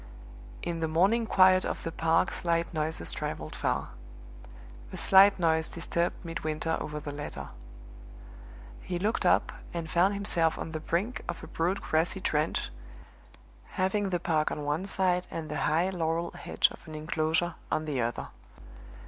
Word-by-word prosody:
In 170 Hz, -1 st, -2 dB
the 160 Hz, -, 0 dB
morning 195 Hz, +9 st, +3 dB
quiet 185 Hz, -2 st, +6 dB
of -, -, -3 dB
the 165 Hz, -, -3 dB
park 165 Hz, +2 st, +2 dB
slight 170 Hz, -1 st, 0 dB
noises 155 Hz, -, -1 dB
traveled -, -, -4 dB
far. -, -, -1 dB, 1.0 s
A -, -, -6 dB
slight 195 Hz, +1 st, +6 dB
noise 160 Hz, -2 st, +2 dB
disturbed 170 Hz, 0 st, -1 dB
Midwinter 160 Hz, -1 st, -2 dB
over 150 Hz, 0 st, -4 dB
the 145 Hz, 0 st, -6 dB
letter. 145 Hz, 0 st, -6 dB, 1.3 s
He 180 Hz, -, -3 dB
looked 210 Hz, +6 st, 0 dB
up -, -, +3 dB, 0.2 s
and 165 Hz, -2 st, -4 dB
found 190 Hz, +4 st, +3 dB
himself 170 Hz, -5 st, +2 dB
on 160 Hz, -, -5 dB
the 160 Hz, -, -3 dB
brink 180 Hz, +10 st, -1 dB
of -, -, -4 dB
a -, -, -7 dB
broad 180 Hz, +4 st, -1 dB
grassy 170 Hz, +5 st, +1 dB
trench, 155 Hz, -, 0 dB, 1.1 s
having 195 Hz, +2 st, +1 dB
the 175 Hz, -2 st, 0 dB
park 160 Hz, -3 st, +1 dB
on 150 Hz, -, -4 dB
one 150 Hz, +6 st, -1 dB
side 180 Hz, -2 st, +1 dB
and 160 Hz, -2 st, -5 dB
the -, -, -2 dB
high 170 Hz, +5 st, +2 dB
laurel 170 Hz, -1 st, -1 dB
hedge -, -, +1 dB
of -, -, -13 dB
an 155 Hz, -, -8 dB
inclosure 160 Hz, +2 st, 0 dB, 0.2 s
on 155 Hz, -, 0 dB
the 140 Hz, -5 st, -1 dB
other. 115 Hz, 0 st, -2 dB
165 Hz, 155 wpm, -29 LUFS, 155-185 Hz, 1.3 s, quiet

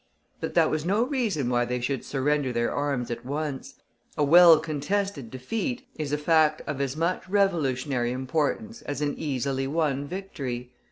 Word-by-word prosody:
But -, -, -4 dB
that -, -, +4 dB
was 155 Hz, -1 st, -1 dB
no 200 Hz, +7 st, +2 dB
reason 235 Hz, -, -1 dB
why 120 Hz, 0 st, +2 dB
they 125 Hz, +1 st, -2 dB
should 130 Hz, +1 st, -2 dB
surrender 140 Hz, 0 st, 0 dB
their 120 Hz, -1 st, 0 dB
arms 140 Hz, -4 st, -1 dB
at 120 Hz, 0 st, -5 dB
once. 145 Hz, +1 st, -4 dB, 0.4 s
A 150 Hz, -, +2 dB
well 170 Hz, +2 st, +8 dB
contested 155 Hz, -, -2 dB
defeat 220 Hz, -, -4 dB
is 150 Hz, -3 st, -4 dB
a 150 Hz, -, +1 dB
fact 155 Hz, 0 st, +3 dB
of 140 Hz, -2 st, -3 dB
as 140 Hz, +1 st, -2 dB
much 175 Hz, +3 st, -1 dB
revolutionary 140 Hz, -10 st, +1 dB
importance 155 Hz, -, -2 dB
as 145 Hz, 0 st, -5 dB
an 145 Hz, -1 st, 0 dB
easily 135 Hz, -2 st, -2 dB
won 145 Hz, -2 st, 0 dB
victory. 135 Hz, -10 st, -5 dB
145 Hz, 165 wpm, -26 LUFS, 130-165 Hz, 0.4 s, well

